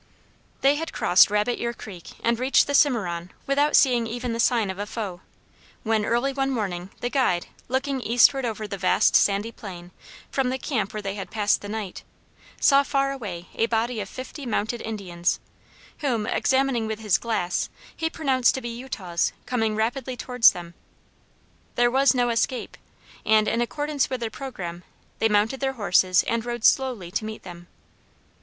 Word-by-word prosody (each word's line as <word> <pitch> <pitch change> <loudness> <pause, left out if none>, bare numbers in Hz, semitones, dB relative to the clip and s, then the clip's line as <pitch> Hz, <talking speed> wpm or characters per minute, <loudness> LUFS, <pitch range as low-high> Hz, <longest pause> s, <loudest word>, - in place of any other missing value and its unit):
They 280 +2 +4
had 325 +1 -5
crossed 180 - +5
Rabbit 210 +4 0
ear 235 0 -2
Creek 185 -7 -10
and 235 0 +1
reached 260 +2 +4
the 285 - -3
Cimarron, 190 - +2 0.2
without 285 +2 +2
seeing 245 -4 +4
even 240 +1 -3
the 230 - -4
sign 230 -4 +2
of 190 - -9
a 205 - -3
foe, 200 -5 -5 0.6
when, 220 -2 +1
early 240 +5 +1
one 270 0 0
morning, 190 -8 -3
the 245 - -1
guide, 215 -11 +1 0.2
looking 265 +1 -1
eastward 245 +4 +4
over 220 -3 -3
the 200 -1 -6
vast - - +3
sandy 205 +3 +3
plain, 180 -6 -10 0.4
from 265 -2 0
the 260 - -1
camp 220 -8 -2
where 215 -2 -5
they 195 0 -3
had 195 -2 -6
passed 210 -1 +1
the 205 - -7
night, 210 -3 -5 0.6
saw 275 0 +6
far 275 -1 0
away 195 -10 -6
a 225 - +1
body 230 0 0
of 200 -2 -5
fifty 260 +3 -8
mounted 230 -1 -2
Indians, 185 -6 -2 0.6
whom, 245 -8 0
after - - -2
examining 265 -4 +1
with 220 0 -3
his 210 -4 +1
glass, 180 -7 -1 0.3
he 320 - -1
pronounced 265 -7 +2
to 265 - -4
be 240 - -5
Utahs 225 -8 -3
coming 225 -3 0
rapidly 245 +3 -2
towards 250 -2 +5
them. 175 -2 -9 1.0
There 240 0 +3
was 270 +1 +4
no 245 -1 +2
escape, 235 +2 -1 0.5
and, 215 0 +4
in 235 - +1
accordance 290 +3 -1
with 255 - -3
their 225 -1 -3
programme, 180 -11 -7 0.4
they 225 - +3
mounted 215 +5 +2
their 270 -1 -1
horses 185 -5 +3
and 230 -1 -1
rode 240 -1 -3
slowly 245 -10 +2
to 215 - -2
meet 215 0 -7
them. 175 -1 -11
230 Hz, 175 wpm, -25 LUFS, 205-260 Hz, 1.0 s, saw